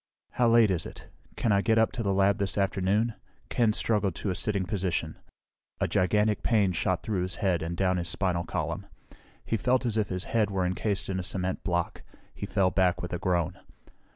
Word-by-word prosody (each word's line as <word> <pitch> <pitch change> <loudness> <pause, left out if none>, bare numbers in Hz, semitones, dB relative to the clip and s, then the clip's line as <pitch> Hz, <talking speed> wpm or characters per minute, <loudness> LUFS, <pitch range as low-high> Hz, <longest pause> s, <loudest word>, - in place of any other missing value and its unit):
"How 125 - +2
late 115 -3 +5
is 90 - -1
it? - - -12 0.3
Can 115 - 0
I 100 0 +4
get 110 +2 +2
up 110 0 +4
to 120 - -4
the 100 -3 0
lab 95 0 +3
this 100 -3 -1
afternoon?" 100 +3 +1 0.4
Ken 115 -3 +2
struggled 105 -4 0
to 100 - -2
a - - -2
sitting 100 -2 0
position. 90 -5 -2 0.6
A - - +1
gigantic 105 +3 +2
pain 105 -5 +2
shot 85 - -1
through 100 -5 -1
his 90 +1 -2
head 90 -4 0
and 85 +1 -4
down 95 -1 +2
his 85 -1 -3
spinal 85 -2 0
column. - - -3 0.6
He 115 - 0
felt 125 +2 +1
as 115 -2 0
if 105 -2 0
his 90 -1 -3
head 110 -3 +1
were 95 -2 0
encased 100 +2 -1
in 95 -1 -2
a - - -3
cement 95 0 -3
block. 85 -2 -1 0.3
He - - -6
fell 95 -3 +2
back 90 -2 +1
with 90 - -5
a 90 - -2
groan. 90 -3 0
95 Hz, 210 wpm, -28 LUFS, 90-105 Hz, 0.6 s, late